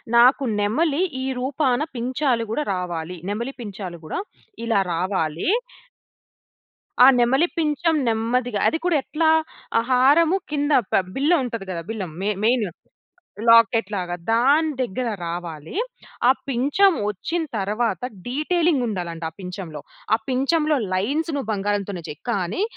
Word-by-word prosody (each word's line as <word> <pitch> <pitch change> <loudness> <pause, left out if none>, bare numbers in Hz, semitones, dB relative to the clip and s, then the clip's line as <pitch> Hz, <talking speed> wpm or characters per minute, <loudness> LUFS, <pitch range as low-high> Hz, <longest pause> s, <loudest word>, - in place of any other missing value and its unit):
నాకు 250 +4 +6 0.2
నెమలి, 280 - +1 0.2
ఈ - - -2
రూపాన 260 -1 +1 0.2
పించాలు 250 0 0
గూడా 265 +7 -1
రావాలి. 180 -2 -4
నెమలి 235 +6 -3
పించాలు 195 -6 -6
గూడా 155 - -4 0.5
ఇలా 225 -3 +2
రావాలీ. 170 - -1 1.5
ఆ - - +11
నెమలి 265 +8 +3
పించం 320 +1 +1
నెమ్మదిగా 230 0 0
అది 320 - +1
కూడా 355 -2 +2
ఎట్లా, 315 +4 +1 0.5
ఆ - - +5
హారము 295 +8 +5
కింద 290 0 0 0.2
ప - - -7 0.2
బిల్ల 285 +5 +2
ఉంటది 230 -5 -4
గదా! 170 -2 -3
బిల్లం 195 -7 -4
మె 200 - 0
మెయిను 225 -4 +2 0.8
లాకెట్ 230 -2 +5
లాగా. 175 -2 -2 0.2
దాని 280 +7 +4
దెగ్గర 245 +1 -2 0.2
రావాలి. 170 -3 -6 0.5
ఆ - - +9 0.2
పించం 280 +10 +3 0.2
వచ్చిన 320 - -3 0.2
తరవాత, 210 0 -1 0.3
డీటేలింగుండాలంట 245 - 0
ఆ - - -40
పించంలో, 180 -5 -7 0.3
ఆ - - -1
పించంలో 300 +4 +2 0.2
లైన్స్‌ 285 - 0
నువ్వు 270 -6 -3
బంగారంతోనే 200 -2 -2
చెయి. 150 - -8
కానీ, 190 - -1
235 Hz, 125 wpm, -23 LUFS, 190-285 Hz, 1.5 s, ఆ